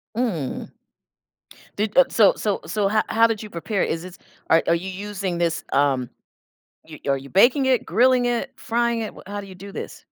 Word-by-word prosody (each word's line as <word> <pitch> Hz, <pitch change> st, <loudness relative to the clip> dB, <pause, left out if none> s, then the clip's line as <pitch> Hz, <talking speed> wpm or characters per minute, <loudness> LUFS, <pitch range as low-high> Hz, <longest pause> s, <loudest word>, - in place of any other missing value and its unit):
Mm. 205 Hz, -, -2 dB, 1.1 s
Did 210 Hz, 0 st, -1 dB
uh, 270 Hz, -, +8 dB
so 210 Hz, -4 st, +5 dB
so 210 Hz, -2 st, -1 dB
so 195 Hz, +4 st, 0 dB
ho 215 Hz, +1 st, +3 dB
how 230 Hz, +1 st, +4 dB
did 225 Hz, -2 st, -2 dB
you 215 Hz, -, -8 dB
prepare 185 Hz, +4 st, -2 dB
it, -, -, -1 dB
is 165 Hz, -, -2 dB
this 180 Hz, 0 st, -10 dB, 0.3 s
are 165 Hz, -, +5 dB
are 170 Hz, -, +4 dB
you 180 Hz, +3 st, -4 dB
using 195 Hz, -1 st, -4 dB
this, 170 Hz, -1 st, 0 dB
um 135 Hz, -3 st, +2 dB, 0.8 s
you 155 Hz, -1 st, -11 dB
are 135 Hz, -, +2 dB
you 135 Hz, +1 st, -11 dB
baking 245 Hz, -, +4 dB
it, 255 Hz, -3 st, +2 dB
grilling 250 Hz, +1 st, +3 dB
it, 245 Hz, +2 st, -1 dB
frying 235 Hz, 0 st, 0 dB
it, 220 Hz, -, -2 dB
w -, -, -12 dB
how 205 Hz, +1 st, -5 dB
do 200 Hz, -, -11 dB
you 190 Hz, -, -11 dB
do 200 Hz, +2 st, -10 dB
this? -, -, -8 dB
200 Hz, 205 wpm, -23 LUFS, 170-230 Hz, 1.1 s, uh